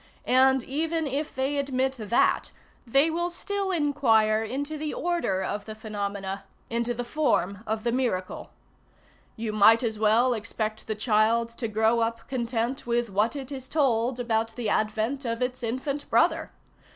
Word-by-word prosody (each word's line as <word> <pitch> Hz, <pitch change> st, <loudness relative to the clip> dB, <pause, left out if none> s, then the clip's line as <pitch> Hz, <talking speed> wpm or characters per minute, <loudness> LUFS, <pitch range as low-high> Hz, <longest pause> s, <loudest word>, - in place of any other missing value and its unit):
And 265 Hz, 0 st, +4 dB
even 320 Hz, +4 st, -1 dB
if 285 Hz, +2 st, -3 dB
they 270 Hz, +2 st, 0 dB
admit 265 Hz, -1 st, 0 dB
that, 220 Hz, +2 st, +1 dB, 0.4 s
they 275 Hz, +7 st, +4 dB
will 345 Hz, +2 st, -1 dB
still 395 Hz, +2 st, -3 dB
inquire 255 Hz, -, +3 dB
into 285 Hz, +7 st, -3 dB
the 305 Hz, 0 st, -4 dB
order 335 Hz, -, 0 dB
of 205 Hz, +2 st, -3 dB
the 215 Hz, -, -7 dB
phenomena, 200 Hz, -2 st, -4 dB, 0.3 s
into 235 Hz, +1 st, -1 dB
the 245 Hz, -, -3 dB
form 225 Hz, -, 0 dB
of 220 Hz, 0 st, -2 dB
the 235 Hz, -, +1 dB
miracle. 230 Hz, -8 st, -2 dB, 0.9 s
You 220 Hz, -1 st, -4 dB
might 220 Hz, +3 st, +6 dB
as 220 Hz, -2 st, -2 dB
well 225 Hz, +4 st, +4 dB
expect 220 Hz, -1 st, -4 dB
the 215 Hz, -, -2 dB
child 220 Hz, +1 st, +2 dB
to 230 Hz, 0 st, -4 dB
grow 220 Hz, +2 st, +2 dB
up 230 Hz, 0 st, -2 dB
content 240 Hz, 0 st, -2 dB
with 235 Hz, -2 st, 0 dB
what 210 Hz, +7 st, +1 dB
it 275 Hz, -1 st, -6 dB
is 265 Hz, -2 st, -7 dB
told 250 Hz, -4 st, +1 dB
about 225 Hz, -2 st, -1 dB
the 235 Hz, -4 st, -2 dB
advent 220 Hz, +7 st, 0 dB
of 230 Hz, -2 st, -2 dB
its 250 Hz, 0 st, -2 dB
infant 260 Hz, +5 st, -3 dB
brother. -, -, +2 dB
235 Hz, 160 wpm, -26 LUFS, 220-270 Hz, 0.9 s, might